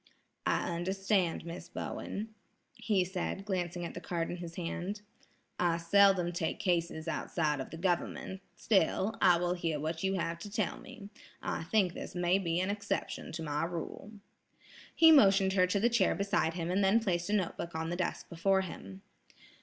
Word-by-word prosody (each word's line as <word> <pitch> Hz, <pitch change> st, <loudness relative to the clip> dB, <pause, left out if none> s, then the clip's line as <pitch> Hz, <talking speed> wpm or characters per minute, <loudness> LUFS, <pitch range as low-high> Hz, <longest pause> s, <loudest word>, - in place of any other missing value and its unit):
"I -, -, +1 dB
understand, 190 Hz, -1 st, 0 dB
Miss 170 Hz, 0 st, -7 dB
Bowen," 215 Hz, +4 st, -5 dB, 0.4 s
he 215 Hz, -6 st, +1 dB
said, 190 Hz, +1 st, -4 dB
glancing 175 Hz, -3 st, -2 dB
at -, -, -6 dB
the 175 Hz, -, -7 dB
card 170 Hz, -2 st, -2 dB
in 175 Hz, -, -4 dB
his 170 Hz, -1 st, -8 dB
hand. 185 Hz, +4 st, -4 dB, 0.6 s
"I 170 Hz, -1 st, +2 dB
seldom 180 Hz, +1 st, +4 dB
take 165 Hz, -2 st, -2 dB
cases 170 Hz, -3 st, -1 dB
outside 155 Hz, -2 st, -1 dB
of 135 Hz, -, -5 dB
the 165 Hz, -, -8 dB
government; 185 Hz, +2 st, -2 dB
still, 200 Hz, +1 st, +2 dB
I 175 Hz, -1 st, +6 dB
will 175 Hz, +1 st, 0 dB
hear 165 Hz, -4 st, -2 dB
what 160 Hz, +2 st, -3 dB
you 190 Hz, 0 st, +1 dB
have 170 Hz, -2 st, -2 dB
to 205 Hz, -, -7 dB
tell 205 Hz, -2 st, -2 dB
me. 245 Hz, -6 st, -11 dB, 0.3 s
I -, -, -3 dB
think 190 Hz, -2 st, +2 dB
this -, -, -7 dB
may 175 Hz, +2 st, +2 dB
be 170 Hz, -2 st, 0 dB
an 185 Hz, +2 st, 0 dB
exception 205 Hz, 0 st, -3 dB
to 165 Hz, 0 st, -4 dB
my 150 Hz, -1 st, -1 dB
rule." 175 Hz, +5 st, -5 dB, 0.8 s
He 325 Hz, -1 st, +8 dB
motioned 195 Hz, -9 st, +6 dB
her 185 Hz, -1 st, +4 dB
to 200 Hz, +2 st, +1 dB
the 225 Hz, -, +4 dB
chair 235 Hz, -5 st, +2 dB
beside 200 Hz, -5 st, 0 dB
him 170 Hz, -1 st, -2 dB
and 195 Hz, +2 st, +2 dB
then 195 Hz, +4 st, +5 dB
placed 180 Hz, -5 st, -1 dB
a -, -, 0 dB
note 190 Hz, -5 st, 0 dB
book 170 Hz, -1 st, -6 dB
on 160 Hz, 0 st, -2 dB
the -, -, -1 dB
desk 180 Hz, -1 st, -3 dB
before 190 Hz, +3 st, +2 dB
him. 95 Hz, -, -8 dB
180 Hz, 185 wpm, -32 LUFS, 170-195 Hz, 0.8 s, He